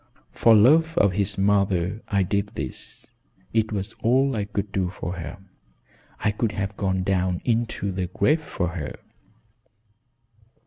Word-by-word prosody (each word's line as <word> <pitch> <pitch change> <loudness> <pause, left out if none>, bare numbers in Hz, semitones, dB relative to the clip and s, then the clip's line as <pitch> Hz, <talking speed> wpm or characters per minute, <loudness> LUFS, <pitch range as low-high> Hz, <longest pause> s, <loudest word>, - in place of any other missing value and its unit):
For 115 -1 +5
love 160 +9 +5
of 100 - +4
his 100 +1 0
mother 100 0 +1
I 100 -2 +2
did 100 +2 -2
this. - - -6 0.5
It 110 -1 +1
was 105 +1 -3
all 130 +3 +3
I 105 -2 -1
could 100 0 -4
do 95 -3 0
for 90 0 -5
her; 80 +2 -6 0.8
I 105 - +1
would 110 -3 +1
have 100 0 -3
gone 95 -2 0
down 90 -2 0
into 115 -4 0
the 90 -1 -2
grave 140 - +2
for 90 - -2
her. 85 -4 -5
100 Hz, 145 wpm, -24 LUFS, 95-110 Hz, 0.8 s, For